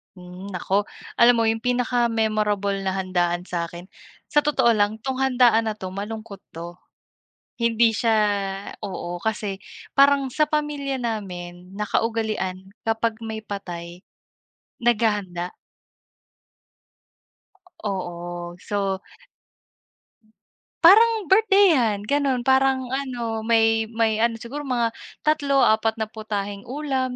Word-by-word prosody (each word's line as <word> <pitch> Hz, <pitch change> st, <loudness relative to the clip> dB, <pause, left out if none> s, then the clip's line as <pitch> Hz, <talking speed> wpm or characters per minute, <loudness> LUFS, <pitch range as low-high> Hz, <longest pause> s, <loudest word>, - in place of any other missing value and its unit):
Hmm, 180 Hz, +1 st, -10 dB
nako, 200 Hz, +1 st, -1 dB, 0.3 s
alam 240 Hz, +1 st, +7 dB
mo 230 Hz, -, +2 dB
'yung 225 Hz, 0 st, +1 dB
pinaka-memorable 220 Hz, -5 st, 0 dB
na 190 Hz, -, 0 dB
handaan 175 Hz, -2 st, 0 dB
sa'kin 170 Hz, -1 st, -5 dB, 0.5 s
sa 295 Hz, -, +5 dB
totoo 290 Hz, -5 st, +3 dB
lang, 210 Hz, 0 st, +2 dB
'tong 265 Hz, -1 st, -2 dB
handaan 245 Hz, -4 st, +4 dB
na 215 Hz, -, -2 dB
'to 185 Hz, -3 st, -7 dB
malungkot 210 Hz, +1 st, -6 dB, 0.2 s
'to. 170 Hz, +2 st, -8 dB, 0.8 s
Hindi 230 Hz, 0 st, +3 dB
siya, 225 Hz, +1 st, +1 dB, 0.7 s
oo, 175 Hz, -4 st, -5 dB
kasi 210 Hz, -1 st, -3 dB, 0.3 s
parang 275 Hz, -1 st, +4 dB
sa 305 Hz, +3 st, +2 dB
pamilya 295 Hz, -2 st, -1 dB
namin 185 Hz, -6 st, -5 dB
nakaugalian 210 Hz, -3 st, -2 dB, 0.2 s
kapag 225 Hz, 0 st, 0 dB
may 220 Hz, -1 st, -6 dB
patay, 175 Hz, -4 st, -7 dB, 0.8 s
naghahanda. 210 Hz, -7 st, 0 dB, 2.3 s
Oo, 175 Hz, -3 st, -5 dB
so. 195 Hz, -1 st, -2 dB, 1.9 s
Parang 430 Hz, +7 st, +8 dB, 0.2 s
birthday-han 370 Hz, -, +4 dB
gano'n 280 Hz, -3 st, +1 dB
parang 265 Hz, -1 st, +2 dB
ano, 245 Hz, -4 st, -3 dB
may 225 Hz, -1 st, +3 dB
may 220 Hz, -1 st, +2 dB
ano, 230 Hz, 0 st, +2 dB
siguro 235 Hz, +6 st, -6 dB
mga 240 Hz, -3 st, +1 dB, 0.3 s
tatlo, 285 Hz, -3 st, +3 dB
apat 220 Hz, +1 st, +3 dB
na 220 Hz, -1 st, -2 dB
putaheng 205 Hz, -2 st, -5 dB
ulam, 260 Hz, -2 st, -2 dB
220 Hz, 105 wpm, -23 LUFS, 195-250 Hz, 2.3 s, Parang